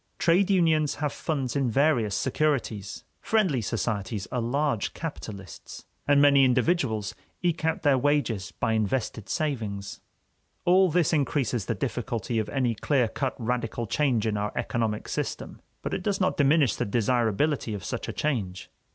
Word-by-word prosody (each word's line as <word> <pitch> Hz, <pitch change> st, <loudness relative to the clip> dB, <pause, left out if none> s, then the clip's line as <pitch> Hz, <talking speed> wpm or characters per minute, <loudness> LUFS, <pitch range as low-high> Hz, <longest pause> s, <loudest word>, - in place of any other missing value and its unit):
Trade 180 Hz, +4 st, +3 dB
unions 160 Hz, -6 st, +3 dB
have 150 Hz, -1 st, -2 dB
funds 135 Hz, -6 st, -2 dB
in 135 Hz, -3 st, +1 dB
various 120 Hz, -5 st, +2 dB
securities; 125 Hz, -8 st, -1 dB, 0.2 s
friendly 190 Hz, -, +1 dB
societies 105 Hz, -2 st, -2 dB
are 125 Hz, -1 st, -1 dB
large 130 Hz, -1 st, -1 dB
capitalists; 105 Hz, -, -8 dB, 0.2 s
and 145 Hz, 0 st, +5 dB
many 140 Hz, -1 st, +6 dB
individuals 125 Hz, -, +1 dB, 0.3 s
eke 170 Hz, -2 st, 0 dB
out 160 Hz, -, 0 dB
their 140 Hz, -3 st, +4 dB
wages 125 Hz, -8 st, 0 dB
by 115 Hz, -, -1 dB
invested 110 Hz, 0 st, -1 dB
savings. 110 Hz, -10 st, -3 dB, 0.6 s
All 185 Hz, +1 st, +5 dB
this 170 Hz, 0 st, +2 dB
increases 130 Hz, -, 0 dB
the -, -, 0 dB
difficulty 115 Hz, 0 st, -2 dB
of 110 Hz, -, -2 dB
any 130 Hz, -4 st, 0 dB
clear 125 Hz, +2 st, +1 dB
cut 135 Hz, +4 st, -3 dB
radical 120 Hz, -1 st, -2 dB
change 120 Hz, -2 st, +1 dB
in 105 Hz, -1 st, 0 dB
our 105 Hz, 0 st, -2 dB
economic 115 Hz, -4 st, -2 dB
system. -, -, -4 dB, 0.2 s
But -, -, -3 dB
it -, -, -2 dB
does 200 Hz, 0 st, -1 dB
not 185 Hz, -, +1 dB
diminish 145 Hz, -4 st, +3 dB
the -, -, -1 dB
desirability 120 Hz, +3 st, +1 dB
of 100 Hz, -, -7 dB
such -, -, -4 dB
a -, -, -2 dB
change. 105 Hz, -11 st, -2 dB
130 Hz, 150 wpm, -27 LUFS, 110-150 Hz, 0.6 s, many